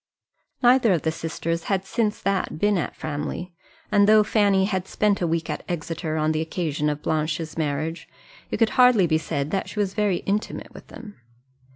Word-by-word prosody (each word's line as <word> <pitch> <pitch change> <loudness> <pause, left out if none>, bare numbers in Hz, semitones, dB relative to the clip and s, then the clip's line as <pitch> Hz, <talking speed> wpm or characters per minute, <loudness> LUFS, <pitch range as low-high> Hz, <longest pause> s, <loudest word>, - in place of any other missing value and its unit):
Neither 245 -4 +5
of 165 - -1
the 160 - +1
sisters 165 +1 -3
had 195 -1 -1
since 215 0 -1
that 195 -5 -1
been 205 +4 +2
at - - -4
Framley; 155 +4 -5 0.4
and 205 0 +5
though 215 0 +7
Fanny 200 -3 +3
had 190 -2 -2
spent 210 -2 +1
a 175 - +1
week 165 0 -1
at - - -3
Exeter 165 -1 -3
on 155 0 +1
the 155 0 0
occasion 160 -2 -1
of 150 0 -4
Blanche's 155 +1 -1
marriage, 155 +1 -3 0.4
it - - -2
could 225 -2 +3
hardly 245 -7 +6
be 160 -1 +2
said 145 -2 -3
that 195 - -2
she - - -10
was 200 -2 0
very 205 -4 0
intimate 205 +2 -3
with - - -13
them. 210 - -11
175 Hz, 190 wpm, -24 LUFS, 160-205 Hz, 0.4 s, though